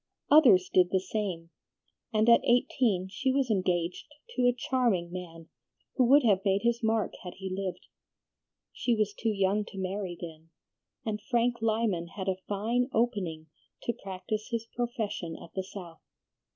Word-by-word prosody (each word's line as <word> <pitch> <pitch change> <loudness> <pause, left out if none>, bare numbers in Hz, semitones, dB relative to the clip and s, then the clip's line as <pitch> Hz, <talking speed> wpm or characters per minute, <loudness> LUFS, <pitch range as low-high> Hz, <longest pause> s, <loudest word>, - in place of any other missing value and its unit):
Others 235 -12 +7
did 180 -1 +5
the 190 - +2
same, 185 -4 -4 0.6
and 215 0 +2
at 235 0 +7
eighteen 240 -5 +2
she 260 +7 -1
was 265 -3 +1
engaged 180 -3 0 0.3
to 245 - +3
a - - +6
charming 240 -8 0
man, 165 -3 -8 0.5
who 255 - +3
would 280 +4 +6
have 200 -5 +3
made 195 +1 +1
his 235 +1 +1
mark 220 -1 +1
had 180 - -7
he 190 -1 -5
lived. 190 -2 -4 0.9
She 240 - +1
was 210 -2 0
too 225 - -1
young 200 0 +1
to 195 - -11
marry 190 -1 -3
then, 165 -1 -9 0.6
and 215 -1 -2
Frank 240 -1 +1
Lyman 215 -6 0
had 190 -2 -5
a 190 0 -1
fine 230 +5 0
opening 190 - -1 0.3
to 235 - -1
practise 195 +2 -5
his 230 -1 -2
profession 220 -8 -3
at 170 - -13
the 190 - -2
South. 180 -4 -10
205 Hz, 160 wpm, -29 LUFS, 185-235 Hz, 0.9 s, Others